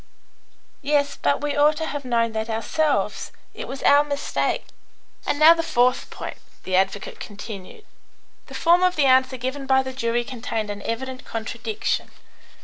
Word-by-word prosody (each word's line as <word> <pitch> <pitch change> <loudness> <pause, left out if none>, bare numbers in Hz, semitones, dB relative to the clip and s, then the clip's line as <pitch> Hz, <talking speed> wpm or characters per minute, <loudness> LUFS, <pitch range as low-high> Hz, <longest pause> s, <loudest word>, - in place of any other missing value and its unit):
"Yes; 285 0 +1
but 145 - 0
we 295 -1 -1
ought 300 +1 +4
to 320 - -2
have 290 -2 -4
known 230 -2 +1
that 220 +1 -3
ourselves. 280 +7 0 0.2
It - - -7
was 270 - -7
our 285 +1 +6
mistake." 285 -1 -1 0.6
"And - - +1
now 310 +2 +9
the 335 - -1
fourth 250 -5 +1
point," - - -7 0.3
the 185 - -1
advocate 195 +1 0
continued. 205 - -9 0.6
"The - - -10
form 345 +1 +4
of 365 0 +3
the 295 - +3
answer 260 0 +4
given 260 +3 -4
by 265 0 +4
the 260 0 -6
jury 240 -2 0
contained 225 -4 -4
an 205 0 -7
evident 255 +3 -4
contradiction. 225 0 -3
260 Hz, 160 wpm, -23 LUFS, 225-290 Hz, 0.6 s, now